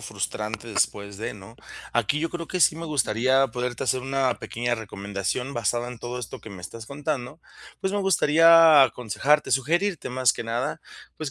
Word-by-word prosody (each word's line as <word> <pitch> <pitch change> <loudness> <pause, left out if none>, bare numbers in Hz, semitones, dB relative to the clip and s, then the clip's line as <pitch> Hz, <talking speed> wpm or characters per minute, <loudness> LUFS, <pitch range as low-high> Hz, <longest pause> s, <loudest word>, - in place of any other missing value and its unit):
frustrante 110 +2 -5
después 100 -2 -1
de, 110 - -4
¿no? 100 +2 -13 0.4
Aquí 120 +5 +1
yo 165 +1 -2
creo 170 -1 -6
que 185 - -2
sí 155 - +5
me 165 - -6
gustaría 130 -1 +2
poderte 125 0 -3
hacer 130 +1 +1
una 130 -1 0
pequeña 120 +1 -2
recomendación 100 +4 -4
basada 120 +1 -1
en 125 -1 -9
todo 125 +1 -5
esto 120 - -7
que 110 - -11
me 95 -2 -10
estás 115 +5 -8
contando. 145 0 -4 0.4
Pues, 190 - -1
me 205 - 0
gustaría 165 -4 +6
aconsejarte, 130 +4 +1
sugerirte 170 +8 0
más 130 -1 +2
que - - -6
nada. 130 +8 -3 0.4
Pues, 155 -3 -5
125 Hz, 175 wpm, -25 LUFS, 115-150 Hz, 0.4 s, gustaría